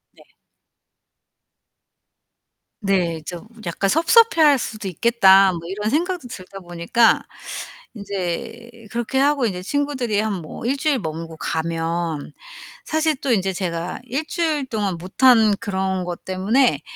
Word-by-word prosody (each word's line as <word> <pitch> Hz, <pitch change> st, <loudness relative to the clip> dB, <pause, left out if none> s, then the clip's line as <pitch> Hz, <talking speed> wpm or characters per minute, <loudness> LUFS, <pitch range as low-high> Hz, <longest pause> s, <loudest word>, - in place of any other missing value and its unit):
네. -, -, -19 dB, 2.6 s
네 180 Hz, -5 st, 0 dB
좀 175 Hz, +4 st, -7 dB, 0.2 s
'약간 175 Hz, +3 st, -1 dB
섭섭해 335 Hz, -, +4 dB
할 295 Hz, -3 st, +6 dB
수도 215 Hz, -4 st, -5 dB
있겠다.' 195 Hz, -1 st, +5 dB
뭐 170 Hz, -, -5 dB
이런 210 Hz, +3 st, -2 dB
생각도 335 Hz, +1 st, -1 dB
들다 195 Hz, -4 st, -9 dB
보니까 175 Hz, +6 st, +2 dB, 0.7 s
인제 215 Hz, +4 st, -5 dB
그렇게 240 Hz, +3 st, -1 dB
하고 280 Hz, -2 st, +3 dB
인제 185 Hz, -5 st, -2 dB
친구들이 260 Hz, -4 st, -1 dB
한 210 Hz, -4 st, -2 dB
뭐 160 Hz, +8 st, -8 dB
1 270 Hz, +3 st, +1 dB
주일 285 Hz, -2 st, +1 dB
머물고 160 Hz, -1 st, -6 dB
가면 165 Hz, -1 st, -2 dB, 0.5 s
사실 315 Hz, -1 st, +1 dB
또 270 Hz, -, 0 dB
인제 195 Hz, -3 st, +1 dB
제가 175 Hz, -2 st, -3 dB
1 270 Hz, +5 st, -3 dB
주일 315 Hz, -5 st, -1 dB
동안 205 Hz, -6 st, -2 dB
못한 220 Hz, +4 st, +4 dB
그런 190 Hz, -2 st, -2 dB
것 175 Hz, -1 st, -6 dB
때문에 190 Hz, -, +2 dB
205 Hz, 235 characters per minute, -21 LUFS, 180-260 Hz, 2.6 s, 할